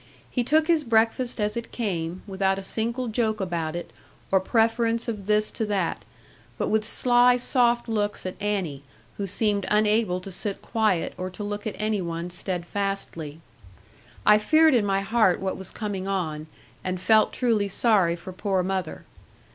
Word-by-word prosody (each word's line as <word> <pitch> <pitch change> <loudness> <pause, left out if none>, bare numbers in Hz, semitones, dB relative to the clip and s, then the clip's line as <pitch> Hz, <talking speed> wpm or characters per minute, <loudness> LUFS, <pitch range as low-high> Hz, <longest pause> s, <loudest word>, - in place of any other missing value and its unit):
He 245 - 0
took 310 +5 +3
his 325 -2 +2
breakfast 230 +1 +1
as 210 0 0
it 235 0 -5
came, 180 -6 -3
without 195 -1 0
a 195 - -5
single 235 +5 -2
joke 220 -1 0
about 170 -4 -2
it, 175 - -6 0.4
or 190 - +5
preference 230 +3 +1
of 210 -4 -4
this 210 0 +2
to 220 - -2
that; 195 -5 -1 0.5
but - - -1
with 215 0 +1
sly 245 0 +4
soft 240 -1 +2
looks 210 -3 -1
at 185 - -3
Annie, 190 -9 -2 0.4
who 200 - -3
seemed 205 0 0
unable 210 -3 +2
to 195 - -8
sit 195 +2 -4
quiet, 215 -7 0
or 185 0 -3
to 185 +3 -7
look 205 +1 -4
at 210 - -4
any 215 -1 0
one 170 0 -4
steadfastly. 180 -3 -4 0.8
I 210 0 +7
feared 315 +7 +5
in 225 -5 +3
my 195 0 +1
heart 215 -3 +2
what 190 -1 -2
was 190 -1 -7
coming 200 -3 -4
on, 160 -6 -2 0.4
and 185 0 -2
felt 215 +3 +4
truly 225 -5 +1
sorry 195 -4 +3
for 175 +2 -9
poor 190 0 0
mother. 185 -3 -3
205 Hz, 170 wpm, -25 LUFS, 185-225 Hz, 0.8 s, I